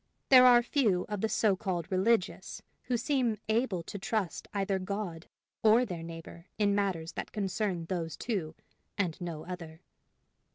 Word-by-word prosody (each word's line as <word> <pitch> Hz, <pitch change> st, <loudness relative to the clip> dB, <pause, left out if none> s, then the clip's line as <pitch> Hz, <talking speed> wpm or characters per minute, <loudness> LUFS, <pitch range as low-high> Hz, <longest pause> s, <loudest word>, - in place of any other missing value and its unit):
There 255 Hz, -1 st, +9 dB
are 240 Hz, -1 st, +7 dB
few 225 Hz, -9 st, +2 dB
of 210 Hz, -2 st, -3 dB
the 220 Hz, -, +1 dB
so 210 Hz, -3 st, +3 dB
called 185 Hz, -2 st, -3 dB
religious 190 Hz, +2 st, 0 dB, 0.2 s
who 245 Hz, -, 0 dB
seem 245 Hz, -3 st, +1 dB
able 220 Hz, -5 st, 0 dB
to 200 Hz, -, -7 dB
trust 195 Hz, -3 st, -2 dB
either 195 Hz, -1 st, 0 dB
God 185 Hz, -3 st, -4 dB, 0.3 s
or 225 Hz, +3 st, +5 dB
their 175 Hz, -7 st, -5 dB
neighbor 165 Hz, +1 st, -9 dB
in 205 Hz, -1 st, +3 dB
matters 190 Hz, -5 st, -1 dB
that -, -, -6 dB
concern 195 Hz, -4 st, -2 dB
those 165 Hz, -2 st, -3 dB
two 180 Hz, -9 st, -3 dB, 0.4 s
and 180 Hz, -4 st, -1 dB
no 165 Hz, -3 st, -5 dB
other. 170 Hz, -2 st, -8 dB
195 Hz, 155 wpm, -30 LUFS, 170-220 Hz, 0.4 s, There